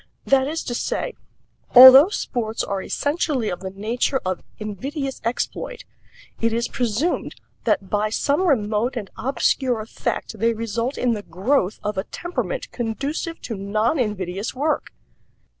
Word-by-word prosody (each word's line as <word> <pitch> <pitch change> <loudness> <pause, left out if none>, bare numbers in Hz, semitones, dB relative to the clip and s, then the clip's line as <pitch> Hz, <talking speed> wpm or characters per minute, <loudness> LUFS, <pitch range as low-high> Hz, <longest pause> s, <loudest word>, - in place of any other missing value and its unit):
That 270 -1 +3
is 320 +2 -3
to 240 - -4
say, - - -2 0.6
although 260 +6 +11
sports 230 - -2
are 195 -1 -2
essentially 285 - -1
of 180 - -4
the 190 - -5
nature 225 +7 -1
of 185 -1 -2 0.2
invidious 270 - -5
exploit, 250 - -3 0.5
it 230 0 +1
is 235 +1 0
presumed 245 +8 -1 0.3
that 195 - +1
by 210 +1 +1
some 290 - +1
remote 230 -2 +1
and 205 -4 -5
obscure 250 0 0
effect 215 +1 -4
they 230 0 +2
result 230 +4 -2
in 245 -2 +1
the 210 - -3
growth 195 +3 0
of 210 -2 -2
a - - -1
temperament 360 +8 -4
conducive 275 +8 -3
to 225 - -5
non 215 +8 0
invidious 200 -2 -2
work. 300 +4 -1
235 Hz, 140 wpm, -22 LUFS, 210-275 Hz, 0.6 s, although